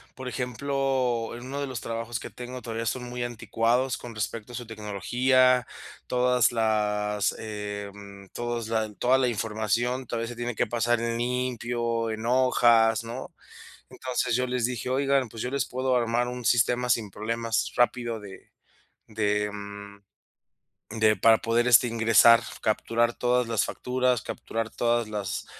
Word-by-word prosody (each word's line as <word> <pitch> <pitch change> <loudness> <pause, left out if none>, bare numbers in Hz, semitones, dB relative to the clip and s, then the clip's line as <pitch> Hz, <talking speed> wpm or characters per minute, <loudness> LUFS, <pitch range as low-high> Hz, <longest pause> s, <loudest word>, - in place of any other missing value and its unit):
Por 130 -1 -6
ejemplo, 130 -1 -1
en 120 - -9
uno 140 +2 -4
de 140 - -2
los 125 -5 -5
trabajos 115 +1 -4
que - - -7
tengo 125 +1 -8
todavía 115 -1 -4
son 125 +3 -2
muy 125 0 -4
anticuados 120 +2 0
con 120 -2 -9
respecto 110 +2 -4
a - - -6
su 120 - -6
tecnología. 120 +4 +2 0.4
Todas 125 -1 +3
las, 105 -2 0
eh, 105 -2 -5
mm, 100 -1 -12
todos 120 -2 -3
la 110 -2 -1
toda 125 +5 +3
la 130 -1 +2
información, 115 +3 -1
todavía 115 0 -3
se 120 - -8
tiene 120 -1 -3
que - - 0
pasar 120 +1 +1
en 115 0 -1
limpio, 120 -2 -1
en 110 +1 -5
hojas, 120 -3 +4
¿no? 120 +3 -7 0.6
Entonces, 125 -2 -2
yo 125 0 0
les 125 -2 0
dije 125 0 -4
:"Oigan, 135 -2 +1
pues, 115 - -6
yo 125 - -3
les 140 +1 0
puedo 130 0 0
armar 120 0 +1
un 125 -1 -6
sistema 120 +1 +2
sin 115 -3 +1
problemas, 115 +3 -2
rápido, 120 -2 +1
de 100 -2 -12 0.6
de, 105 -1 0
mm, 100 0 -9 1.0
de 110 -1 +4
para 115 -1 +5
poder, 115 +1 +1
este, 120 0 +7
ingresar 115 +1 +6 0.2
capturar 115 +2 +1
todas 125 0 +1
las 115 -3 +1
facturas, 125 -2 0
capturar 115 -1 -4
todas 120 -1 0
las 100 -3 -4
115 Hz, 155 wpm, -26 LUFS, 110-125 Hz, 1.0 s, este